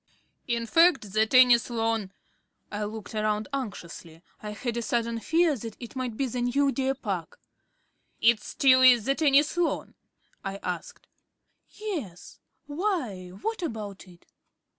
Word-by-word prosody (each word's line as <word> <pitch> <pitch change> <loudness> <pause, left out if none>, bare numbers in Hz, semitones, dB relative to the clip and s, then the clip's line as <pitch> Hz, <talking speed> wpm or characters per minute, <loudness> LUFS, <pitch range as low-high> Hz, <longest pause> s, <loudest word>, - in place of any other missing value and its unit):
"In 235 -2 -1
fact, 325 - +3
the 215 0 +3
tennis 250 -1 +6
lawn 225 -4 -1 0.3
" - - -48
I 210 0 -3
looked 215 0 -7
round 215 0 -1
anxiously. 175 -9 -6 0.2
I 210 - -6
had 230 +3 -4
a - - -1
sudden 235 0 -1
fear 325 +4 +2
that 225 -2 -8
it 240 0 -9
might 250 -4 -4
be 275 - 0
the 250 -1 -3
new 275 +3 +2
deer 270 0 -1
park. 195 - -5 0.8
"It 230 -1 +4
still 260 +3 +4
is 245 -4 +6
the 270 - +2
tennis 290 +1 +3
lawn?" 350 - -1 0.5
I 195 0 -4
asked. 180 -2 -5 0.6
"Yes. 305 - -7 0.3
Why, 290 - -2 0.2
what 445 -3 -2
about 210 - -6
it?" 175 -1 -18
235 Hz, 145 wpm, -27 LUFS, 210-275 Hz, 0.8 s, tennis